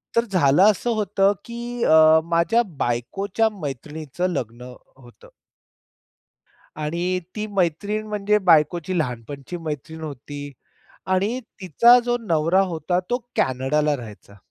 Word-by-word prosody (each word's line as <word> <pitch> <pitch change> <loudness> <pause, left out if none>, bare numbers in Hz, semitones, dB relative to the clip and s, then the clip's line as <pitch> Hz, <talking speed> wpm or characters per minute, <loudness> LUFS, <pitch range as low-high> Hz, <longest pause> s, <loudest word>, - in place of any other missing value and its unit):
तर 230 0 +3
झालं 180 - +3
असं 225 +4 -4
होतं 200 -1 +2
की 240 0 -5
अ, 160 0 +6
माझ्या 170 +8 +2 0.2
बायकोच्या 195 - -1
मैत्रिणीचं 150 +4 -4
लग्न 125 -4 -5 0.2
होतं. 120 -2 -17 1.5
आणि 170 +4 -2 0.2
ती 215 0 -3
मैत्रीण 205 +3 -1
म्हणजे 210 0 +1
बायकोची 165 +3 +2
लहानपणाची 135 +5 -5
मैत्रीण 160 0 -6
होती 145 -1 -7 0.6
आणि 210 +7 0 0.2
तिचा 235 - +6
जो 240 0 +1
नवरा 165 +3 +3
होता 165 +3 -1
तो 245 - +1 0.2
कॅनडाला 145 +3 +1
राहायचा. 105 -3 -12
165 Hz, 110 wpm, -22 LUFS, 145-200 Hz, 1.5 s, अ